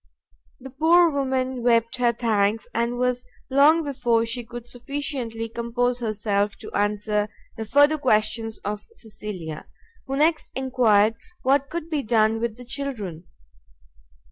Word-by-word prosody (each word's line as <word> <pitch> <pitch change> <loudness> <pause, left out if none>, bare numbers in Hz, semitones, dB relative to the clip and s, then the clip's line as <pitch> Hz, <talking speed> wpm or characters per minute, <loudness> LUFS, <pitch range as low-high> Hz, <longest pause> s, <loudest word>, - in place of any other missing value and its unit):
The 265 0 -10
poor 330 +5 +5
woman 260 -2 -1
wept 230 -1 +2
her 245 -1 +3
thanks, 220 -2 +1
and 235 +1 0
was 250 0 0 0.3
long 300 +5 +5
before 245 -5 +1
she 240 +1 -3
could 240 +1 -9
sufficiently 245 -3 -4
compose 235 +2 -1
herself 205 -2 -1
to - - -10
answer 210 0 0 0.3
the 225 -1 -5
further 290 +6 +4
questions 225 -2 +1
of 210 0 -4
Cecilia, 200 -8 -7 0.4
who 270 0 -2
next 310 +2 +2
enquired 230 -5 +3 0.3
what 275 +1 +2
could 335 -1 -4
be 310 -3 -1
done 220 -2 +2
with 230 -1 -3
the 250 - -11
children? 230 - -5
235 Hz, 135 wpm, -24 LUFS, 215-265 Hz, 0.4 s, poor